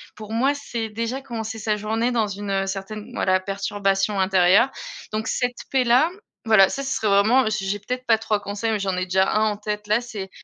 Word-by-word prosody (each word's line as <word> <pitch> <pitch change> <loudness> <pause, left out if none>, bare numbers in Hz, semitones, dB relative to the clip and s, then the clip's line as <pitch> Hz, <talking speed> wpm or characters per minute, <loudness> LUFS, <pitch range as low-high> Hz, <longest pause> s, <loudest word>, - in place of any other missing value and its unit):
pour 215 0 -10
moi 265 +5 +2
c'est 230 -5 -4
déjà 230 +5 -3
commencer 225 -3 -5
sa 215 0 0
journée 220 +3 -1
dans 230 -3 +1
une, 200 0 -6
heu, 195 0 0
certaine 200 +2 -6
voilà, 185 0 +2
perturbation 195 0 -1
intérieure. 190 +5 +4 0.4
Donc 220 +1 -2
cette 245 -1 -1
paix 265 -1 +2
là, 250 +7 +4 0.3
voilà 215 -4 +6
ça 275 - -4
ce 270 - -3
serait 220 - -1
vraiment, 215 +6 +4
j'ai 195 -2 -2
j'ai 205 - -1
peut-être 250 +5 -5
pas 225 -1 +5
3 215 -1 -1
conseils 205 +3 -3
mais 215 - 0
j'en 190 -2 -1
ai 180 - -1
déjà 190 +1 +2
1 215 0 +2
en 205 - -5
tête 210 0 -4
là. 215 +3 +2
C'est, 210 -5 -7
215 Hz, 220 wpm, -23 LUFS, 195-230 Hz, 0.4 s, voilà